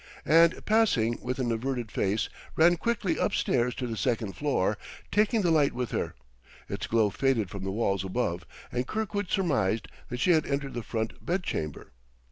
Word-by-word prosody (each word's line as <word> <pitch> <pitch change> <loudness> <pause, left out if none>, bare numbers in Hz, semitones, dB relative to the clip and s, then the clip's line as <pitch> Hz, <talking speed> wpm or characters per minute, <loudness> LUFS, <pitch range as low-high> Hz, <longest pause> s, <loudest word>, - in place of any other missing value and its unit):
and, 165 +2 +5
passing 145 - +3
with 125 +1 -3
an 125 -3 0
averted 120 -1 -2
face, 100 +3 0 0.3
ran 170 +2 +6
quickly 195 -3 -1
up - - +1
stairs 125 -1 +1
to 130 - -3
the 115 -2 -3
second 110 -4 -1
floor, 135 -9 +1 0.4
taking 210 +1 +3
the 175 - +3
light 150 -3 +3
with 125 -1 -3
her. - - -2 0.5
Its - - -4
glow 110 -3 +3
faded 120 -8 +1
from 100 -2 -6
the 95 - -2
walls 100 -3 0
above 90 -3 -1 0.3
and 125 +1 -2
Kirkwood 205 -3 -2
surmised 115 - +1 0.2
that 125 - -4
she 180 - +3
had 155 -2 +3
entered 140 -1 -2
the 120 - -3
front 110 0 -4
bedchamber. 170 - -3
125 Hz, 175 wpm, -28 LUFS, 110-165 Hz, 0.5 s, ran